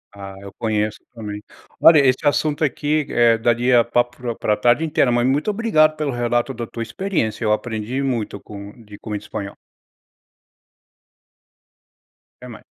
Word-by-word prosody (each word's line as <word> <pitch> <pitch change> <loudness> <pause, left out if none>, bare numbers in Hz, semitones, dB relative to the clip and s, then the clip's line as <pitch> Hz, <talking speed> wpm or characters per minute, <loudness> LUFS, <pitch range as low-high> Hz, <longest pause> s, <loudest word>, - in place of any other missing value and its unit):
Ah, 100 -1 -9
eu 100 -1 -11
conheço 105 -1 -1 0.2
também. 105 -2 -6 0.4
Olha, 165 -1 +8
esse 130 -1 +3
assunto 145 +1 +1
aqui, 150 +1 0
eh, 120 -1 +4
daria 120 +1 +3
papo 120 +1 0
pro 120 -2 -4
pra 105 - +1
tarde 120 +9 +2
inteira, 150 -5 +2
mas 120 0 +2
muito 140 +9 +1
obrigado 200 -8 +2
pelo 150 -2 -2
relato 120 +1 -1
da 120 -1 -6
tua 115 - -5
experiência. 115 - -2
Eu 105 - +1
aprendi 110 +3 -2
muito 115 -6 -2
com 100 0 -10
de 105 -1 -13
como 105 -2 -5
é - - -1
o - - -7
espanhol. 105 -1 -7 2.9
Até - - -9
mais. - - -11
120 Hz, 160 wpm, -20 LUFS, 110-140 Hz, 2.9 s, Olha